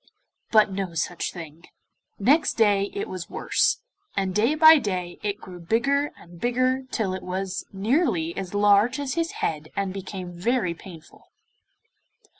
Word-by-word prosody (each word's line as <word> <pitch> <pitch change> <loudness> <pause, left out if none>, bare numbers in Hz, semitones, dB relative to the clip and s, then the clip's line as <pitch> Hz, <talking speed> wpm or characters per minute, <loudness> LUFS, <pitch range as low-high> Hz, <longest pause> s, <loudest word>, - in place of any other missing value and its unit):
But 215 -2 +5
no 190 -3 -4
such 165 +2 -2
thing. 165 -1 -10 0.5
Next 285 +10 +3
day 205 -3 +3
it 200 - -4
was 185 -2 -6
worse, - - +1 0.4
and 190 -1 0
day 230 +9 +2
by 315 0 +8
day 185 -6 -3
it 205 0 -2
grew 180 -4 -10
bigger 275 +11 +1
and 170 0 -15
bigger 255 +2 +1
till 210 -7 -1
it 190 - -4
was 185 +1 -4
nearly 195 - 0
as 195 0 -5
large 205 +6 +4
as 275 -2 -2
his 330 0 -1 0.2
head 155 -1 -3
and 195 -1 -2
became 190 -2 -6
very 185 0 0
painful. 170 -2 -14
200 Hz, 150 wpm, -25 LUFS, 180-240 Hz, 0.5 s, by